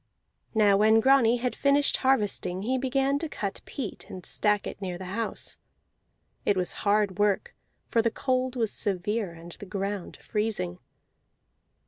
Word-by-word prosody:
Now 205 -2 +5
when 220 +2 +5
Grani 245 -1 +5
had 250 +1 -2
finished 280 +1 +3
harvesting 205 -7 +1
he 260 +4 0
began 270 +2 +1
to 325 0 -3
cut 200 -7 -4
peat 250 -9 -6
and 185 - -8
stack 210 -1 +1
it - - -6
near 180 -2 -3
the 185 - -7
house. 230 +1 -3 0.8
It 200 - +2
was 180 -1 0
hard 205 -2 +2
work, 205 -1 +1 0.3
for 230 - +2
the 230 - +2
cold 255 +2 -1
was 225 -4 0
severe 200 -1 -1
and 170 +1 -11
the 200 - -9
ground 195 0 -4
freezing. 210 - -2
210 Hz, 150 wpm, -27 LUFS, 195-250 Hz, 0.8 s, Now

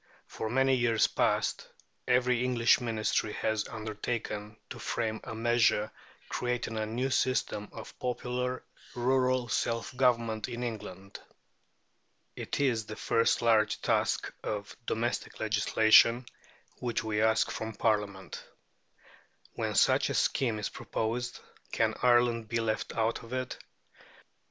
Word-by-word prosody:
For 110 - -5
many 135 +2 +3
years 115 -3 +3
past, - - 0 0.4
every 125 -1 +3
English 125 -1 +3
Ministry 110 -2 -1
has 110 -1 -1
undertaken 110 -1 -4
to - - -7
frame 110 -2 -2
a 110 - -6
measure 115 -2 +2 0.4
creating 120 -2 -2
a 110 0 -2
new 125 +4 -2
system 130 -6 0
of - - -10
popular 125 +1 -2 0.3
rural 130 0 +2
self 115 +2 -1
government 115 -3 +1
in 120 0 -4
England. 100 -4 -6 1.2
It - - -4
is 120 -6 +1
the 110 - -6
first 115 +2 +1
large 110 -2 +3
task - - 0
of 105 -1 -4
domestic 120 +2 -2
legislation 110 +2 +4 0.5
which 120 -2 -2
we 110 -1 -1
ask 110 0 +3
from 110 -1 -5
Parliament. 100 -4 -1 1.1
When - - -2
such - - +4
a - - -2
scheme 120 -5 +1
is 105 - -3
proposed, 120 +2 -3 0.3
can - - +1
Ireland 120 -2 +3
be 115 +2 -1
left 110 -1 -1
out 115 +1 0
of 115 +2 -10
it? 130 0 -3
115 Hz, 125 wpm, -30 LUFS, 110-125 Hz, 1.2 s, legislation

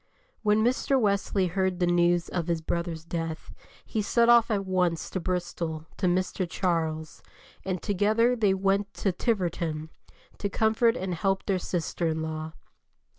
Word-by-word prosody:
When 210 0 +3
Mr. 260 +3 +2
Wesley 200 -3 +1
heard 185 0 0
the 180 - +3
news 175 0 +3
of 175 -2 -3
his 170 -1 0
brother's 165 0 -3
death 165 -1 -4 0.3
he 220 - -1
set 235 +3 +3
off 235 -1 +6
at 200 -3 0
once 180 -3 0
to 190 - -2
Bristol 170 -3 -3
to 185 - +1
Mr. 185 0 0
Charles, 160 -3 -2 0.4
and 185 -2 -3
together 220 +4 +2
they 205 -5 +2
went 195 +1 +1
to 195 - 0
Tiverton 170 -7 -2 0.5
to 200 - -1
comfort 225 +3 +2
and 185 -1 -3
help 195 +3 0
their 190 -2 +1
sister 175 -1 -2
in 160 0 -1
law. 155 0 -5
185 Hz, 155 wpm, -27 LUFS, 170-205 Hz, 0.5 s, off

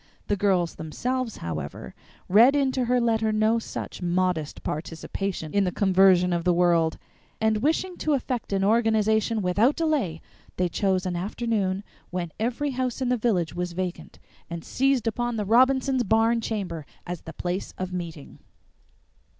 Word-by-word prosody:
The 205 - +3
girls 185 -4 +1
themselves, 245 +9 -3
however, 75 -3 -6 0.3
read 235 +9 +6
into 265 -3 +1
her 250 +1 +2
letter 225 -2 +1
no 215 +2 +2
such 225 - -7
modest 175 -3 -1
participation 165 +2 -4
in 200 - +3
the 180 - 0
conversion 185 -2 +4
of 170 -1 -1
the 175 0 +3
world, 170 -2 +3 0.4
and 220 -1 +2
wishing 340 +6 0
to 305 - 0
effect 250 -5 -2
an 195 -1 +1
organization 220 0 +2
without 205 +10 +3
delay, 290 - 0 0.4
they 180 -1 +1
chose 190 +1 0
an 180 -1 -2
afternoon 200 0 -1 0.3
when 175 -2 -3
every 250 +6 -1
house 255 -1 -2
in 255 -2 0
the 250 - +3
village 205 -9 0
was 175 0 -3
vacant, 180 0 -5 0.3
and 170 -1 -6
seized 270 -3 +1
upon 240 +1 -1
the 210 -2 -2
Robinsons' 260 +4 +3
barn 225 +2 +2
chamber 190 -8 -3 0.2
as 175 -1 -5
the 165 - -9
place 180 +2 -3
of 185 0 -4
meeting. 165 -5 -7
205 Hz, 155 wpm, -25 LUFS, 180-240 Hz, 0.4 s, read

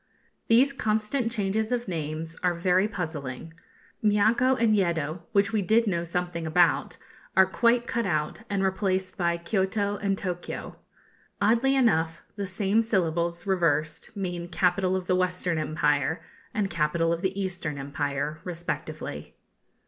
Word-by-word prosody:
These 255 +5 +5
constant 220 +1 0
changes 215 0 0
of 245 -2 -1
names 160 -1 -3
are 180 -1 +1
very 180 +3 +2
puzzling. 160 - -5 0.5
Miaco 220 +5 +4
and 225 -2 +4
Yeddo, 170 -4 0
which 200 0 +2
we 215 - +2
did 220 +4 +3
know 170 -5 0
something 170 -1 -3
about, 170 +2 +2 0.4
are 190 - +8
quite 235 +5 +2
cut 235 -3 -1
out, 155 +3 -1
and 200 -1 0
replaced 190 -1 0
by 170 -2 +1
Kioto 200 +3 -1
and 195 -1 0
Tokio. 180 -3 -5 0.6
Oddly 235 +6 +3
enough, 165 -10 +2
the 200 -2 -3
same 200 +3 +2
syllables, 170 -5 0
reversed, 165 +1 0
mean 175 -3 -3
capital 185 +1 +1
of 185 -1 -2
the 185 - +2
Western 180 -2 0
Empire 150 -1 +1 0.3
and 205 -3 -1
capital 165 +1 +1
of 170 - -3
the 190 +1 -1
Eastern 175 -6 -3
Empire 145 +2 -3
respectively. 160 - -5
185 Hz, 140 wpm, -27 LUFS, 165-205 Hz, 0.6 s, are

